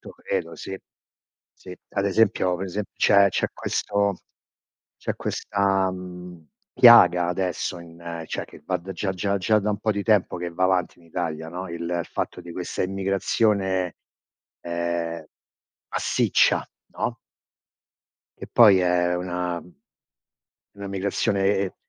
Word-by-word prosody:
To - - -11
credo, - - -4
sì. 95 - -6 0.8
Sì, 90 - -10 0.2
ad 100 - -1
esempio 95 -3 +2
per 95 +2 -4
esemp 100 +2 -4
c'è 100 0 +5
c'è - - 0
questo 100 -1 -1 0.8
c'è - - -4
questa, 95 -2 0
mhmm, 90 -3 -10 0.2
piaga 90 -8 +7
adesso 90 0 -2
in 85 0 -8
cioè, - - -4
che - - -15
va 90 -1 0
da 90 +3 -10
già 95 +1 -2
già 100 +2 -1
già 105 +3 +3
da 105 +1 -1
un 105 - -2
po' 110 0 0
di 100 - -2
tempo 105 -4 +2
che 85 0 -4
va 95 +2 0
avanti 95 -2 0
in 85 - -21
Italia, 80 -1 -4
no 90 +3 -6
il 85 +1 -3
fatto - - -4
di 85 - -11
questa 90 0 -3
immigrazione, 95 -1 0 0.7
ehm, 85 -1 -3 0.7
massiccia, - - +2 0.3
no? - - -2 1.2
Che - - -9
poi 105 -5 +7
è 90 -1 +2
una 90 -1 -3
una 90 - -18 1.0
una 100 0 -7
migrazione 100 0 0
e 95 -1 -2
90 Hz, 140 wpm, -24 LUFS, 85-100 Hz, 1.2 s, piaga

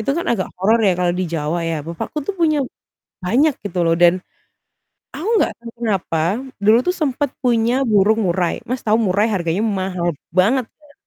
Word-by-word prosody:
Itu 245 +6 0
kan 335 +4 -2
agak 210 -6 -1
horor 220 +4 +4
ya 190 - +4
kalau 180 -1 +1
di 185 - -1
Jawa 165 0 -2
ya. 165 -2 -2
Bapakku 165 - -5
tuh 380 +8 -4
punya 310 -4 +2 0.6
banyak 265 +11 +2
gitu 185 -3 -5
loh 165 - +3
dan 175 +1 +4 0.9
aku 315 +10 -5
enggak - - +2
tahu 235 - -9
kenapa, 195 -8 -1 0.5
dulu 220 +3 +6
tuh 360 - +2
sempat 290 -3 0 0.2
punya 240 +2 +2
burung 215 0 +3
murai. 175 0 0
Mas, 255 +1 -2
tahu 215 0 +4
murai 200 +4 +2
harganya 180 -1 -1
mahal 185 -5 -1 0.2
banget 225 +8 +3 0.2
ya. 295 -1 -21
210 Hz, 180 wpm, -19 LUFS, 180-255 Hz, 0.9 s, dulu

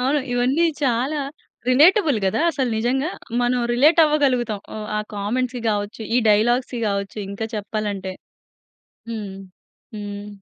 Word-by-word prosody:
అవును. 275 +4 +2
ఇవన్నీ 260 +7 +2 0.2
చాలా 260 +5 +1 0.5
రిలేటబుల్ 305 - +5
గదా 190 - +1
అసలు 265 -6 -1
నిజంగా. 265 +8 0 0.3
మనం 245 +1 +2 0.2
రిలేట్ 305 +7 +5
అవ్వగలుగుతాం. 255 -8 +1 0.2
ఆహ్, 215 - -5
ఆ - - +1 0.2
కామెంట్స్‌కి 245 +4 -2
కావచ్చు. 205 +2 -3
ఈ - - +5
డైలాగ్స్‌కి 240 +3 +2
కావచ్చు. 200 +1 -3
ఇంకా 210 +3 -4
చెప్పాలంటే. 205 -2 -3 1.0
హ్మ్. 205 -4 -5 0.6
హ్మ్. 205 0 -6
240 Hz, 120 wpm, -22 LUFS, 205-265 Hz, 1.0 s, రిలేటబుల్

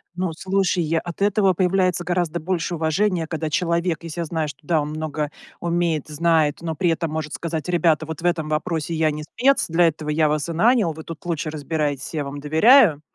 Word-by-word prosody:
Ну, 180 -1 -1
слушай, 190 +1 0
я 165 +1 0
от 175 +3 -8
этого 200 -2 +3
появляется 185 -1 +1
гораздо 175 -1 -1
больше 175 +1 -2
уважения, 165 +2 0
когда 160 -1 -3
человек, 170 0 0
если 165 +1 -5
я - - -2
знаю, 160 -1 -2
что, 145 - -9
да, 160 0 +1
он 145 - -4
много 155 -1 -3 0.3
умеет, 170 -3 -1
знает, 155 -1 +1
но 165 -1 -3
при 175 +3 +1
этом 165 -1 -1
может 155 -1 -4
сказать: 160 -1 -4
"Ребята, 165 -3 +2
вот 160 0 -7
в - - -7
этом 165 -3 0
вопросе 160 +1 -2
я 155 -1 +2
не 150 +1 -5
спец, 265 - +1
для 170 +1 +3
этого 155 -1 -3
я 155 +1 +2
вас 150 +2 -1
и - - -2
нанял, 215 -1 +3
вы 160 +1 -9
тут 165 -1 -9
лучше 165 -2 -2
разбирайтесь, 150 -2 -3
я 150 - -1
вам 140 +1 -6
доверяю". 160 - +5
165 Hz, 210 wpm, -22 LUFS, 155-175 Hz, 0.3 s, доверяю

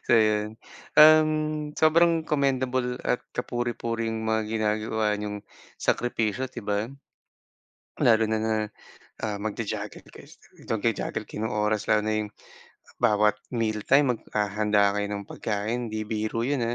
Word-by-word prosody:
So - - +2
'yon. 110 0 +2 0.4
Uhm, 155 -1 +5
sobrang 165 +1 +4
commendable 130 -3 0
at 125 - +1 0.2
kapuri-puring 115 -2 -2
mga 110 0 +1
ginagawa 110 -1 0
niyong 105 0 -4 0.4
sakripisyo, 120 +1 0
di 120 - -6
ba? 105 +1 0 1.1
Lalo 115 -1 +4
na 110 - +1
na, 110 0 0 0.7
ah, 105 -2 -2
magja-juggle 105 0 -4
kayo - - -14
sa - - -8
magja-juggle 115 0 -1
kayo 110 - -3
ng 115 - -4
oras, 105 0 0
lalo 110 0 +3
na 110 +1 -1
yung - - -14 0.7
bawat 105 0 +4 0.2
mealtime 120 +4 +2
maghahanda 105 -1 +1
kayo 105 0 -1
ng 100 -1 -4
pagkain 110 +3 -2
'di 110 0 -2
biro 110 +1 -2
yun, 140 -2 0
110 Hz, 130 wpm, -26 LUFS, 105-125 Hz, 1.1 s, Uhm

